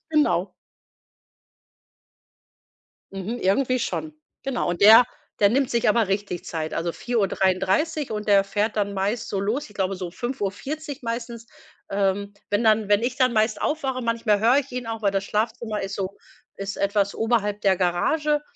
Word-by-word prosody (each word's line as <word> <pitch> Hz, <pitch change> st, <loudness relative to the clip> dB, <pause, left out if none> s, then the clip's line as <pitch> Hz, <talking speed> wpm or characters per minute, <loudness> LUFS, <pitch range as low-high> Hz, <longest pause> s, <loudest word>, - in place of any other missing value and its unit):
Genau. 190 Hz, -, +2 dB, 2.6 s
Mhm, 195 Hz, +5 st, -4 dB
irgendwie 255 Hz, +6 st, +1 dB
schon. 310 Hz, +5 st, -3 dB, 0.3 s
Genau. 270 Hz, -3 st, -2 dB
Und 175 Hz, 0 st, -2 dB
der 220 Hz, +4 st, +9 dB, 0.4 s
der 200 Hz, -, +6 dB
nimmt 265 Hz, +2 st, +1 dB
sich 235 Hz, -2 st, +1 dB
aber 220 Hz, -1 st, +3 dB
richtig 195 Hz, -3 st, -2 dB
Zeit. 160 Hz, -1 st, -4 dB
Also 170 Hz, +1 st, -1 dB
4:33 200 Hz, -, 0 dB
und 210 Hz, -1 st, -4 dB
der 200 Hz, -2 st, +5 dB
fährt 205 Hz, +2 st, -1 dB
dann 200 Hz, -1 st, 0 dB
meist 200 Hz, +4 st, -2 dB
so 195 Hz, -, -2 dB
los 215 Hz, +7 st, -2 dB
ich 210 Hz, -, -16 dB
glaube 195 Hz, 0 st, 0 dB
so 180 Hz, -2 st, -5 dB
5:40 265 Hz, -, -4 dB
meistens, 230 Hz, 0 st, -5 dB, 0.4 s
ähm, 200 Hz, 0 st, 0 dB, 0.2 s
wenn 205 Hz, +3 st, +1 dB
dann 215 Hz, -1 st, +3 dB
wenn 205 Hz, +2 st, +3 dB
ich 250 Hz, +1 st, -1 dB
dann 255 Hz, -1 st, +3 dB
meist 220 Hz, -1 st, +1 dB
aufwache 270 Hz, -5 st, -1 dB
manchmal 230 Hz, -3 st, +1 dB
höre 240 Hz, +5 st, +5 dB
ich 280 Hz, -2 st, -4 dB
ihn 245 Hz, -2 st, -4 dB
auch, 225 Hz, -1 st, -4 dB
weil 200 Hz, -2 st, +1 dB
das 195 Hz, -1 st, 0 dB
Schlafzimmer 220 Hz, 0 st, -2 dB
ist 195 Hz, +1 st, -4 dB
so 195 Hz, 0 st, -4 dB, 0.4 s
ist 195 Hz, +1 st, -5 dB
etwas 200 Hz, 0 st, +1 dB
oberhalb 215 Hz, -3 st, 0 dB
der 195 Hz, -2 st, +3 dB
Garage, 295 Hz, -, +1 dB
210 Hz, 160 wpm, -24 LUFS, 195-240 Hz, 2.6 s, der